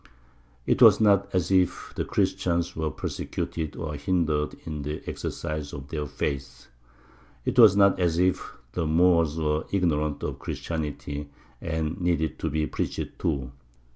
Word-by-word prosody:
It - - +1
was - - +8
not 100 -2 +4
as 90 0 0
if 90 -2 +1
the - - -1
Christians 85 -1 0
were 80 -1 -1
persecuted 80 0 -4
or 80 -3 -4
hindered 75 0 0
in 75 -2 -4
the 75 +2 -5
exercise 75 -2 -4
of 70 -1 -8
their 75 -2 -3
faith; 70 -3 -4 0.8
it - - +1
was 105 -4 +8
not 100 -1 +5
as 85 -2 +1
if 90 +1 +1 0.2
the 80 +4 -2
Moors 85 -1 +3
were 75 -1 0
ignorant 75 -6 0
of - - -3
Christianity 75 -2 -4 0.3
and 80 +1 -2
needed 85 -3 0
to - - -1
be 75 +1 0
preached - - -4
to. 70 -6 -1
80 Hz, 145 wpm, -26 LUFS, 75-90 Hz, 0.8 s, was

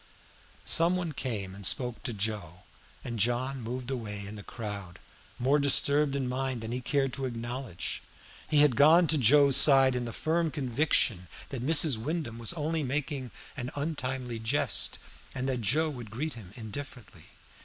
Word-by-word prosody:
Some 170 +2 +4
one 175 -3 -3
came 110 -9 -4
and 100 +1 -11
spoke 120 +5 +2
to - - -3
Joe, 100 -5 -4 0.4
and 115 -2 -5
John 125 +4 0
moved 125 +3 -5
away 105 -5 -5
in 100 - -8
the 105 - -8
crowd, 100 -5 -7 0.4
more 135 +4 +2
disturbed 140 0 +2
in 135 -2 -2
mind 130 -1 -3
than 110 0 -6
he 125 +1 -3
cared 135 -1 0
to 135 -1 -3
acknowledge. 120 -3 -5 0.5
He 150 -2 +4
had 145 -5 +4
gone 160 +6 +6
to 160 - +3
Joe's 140 +3 +6
side 135 -3 +7
in 125 -1 -2
the 115 - -5
firm 165 +5 0
conviction 130 - 0 0.2
that 135 -4 -5
Mrs. 150 -1 +5
Wyndham 130 -3 -4
was 115 - 0
only 160 0 -2
making 135 -1 -3 0.3
an 125 -2 -5
untimely 130 -5 -4
jest, 115 +6 0 0.4
and 130 +1 -3
that 130 -3 -2
Joe 155 +9 +2
would 120 -6 -9
greet 140 +8 -4
him 105 -6 -11
indifferently. 120 0 -9
130 Hz, 165 wpm, -29 LUFS, 115-145 Hz, 0.5 s, side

